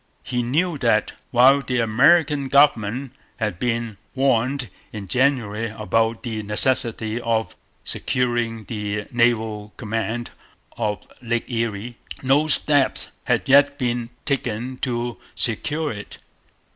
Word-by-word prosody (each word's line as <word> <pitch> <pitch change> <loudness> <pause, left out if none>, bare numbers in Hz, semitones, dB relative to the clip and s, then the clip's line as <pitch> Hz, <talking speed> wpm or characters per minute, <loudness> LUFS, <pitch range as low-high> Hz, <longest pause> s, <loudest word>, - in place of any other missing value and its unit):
He 125 -1 -2
knew 150 +6 0
that, 115 -4 +2 0.2
while 130 +3 +5
the 125 -2 -2
American 140 +5 +3
government 130 -2 +2 0.2
had 105 -6 -3
been 115 -3 -2 0.2
warned 130 -1 +1 0.2
in 105 -3 -7
January 115 -3 +1
about 110 +2 -1
the 110 -3 -3
necessity 110 +1 +2
of 110 -4 -1 0.3
securing 120 -3 -1
the 105 -1 -4
naval 110 -3 0
command 115 +1 -3 0.4
of 105 -1 -3 0.2
Lake 120 -1 -2
Erie, 115 0 -3 0.3
no 140 +4 +3
steps 145 -2 +3 0.2
had - - 0
yet 140 +1 +5
been 120 -3 -2 0.2
taken 130 -3 -2
to 120 -2 -3 0.2
secure 150 +7 0
it. 105 -2 -8
120 Hz, 115 wpm, -22 LUFS, 110-130 Hz, 0.4 s, while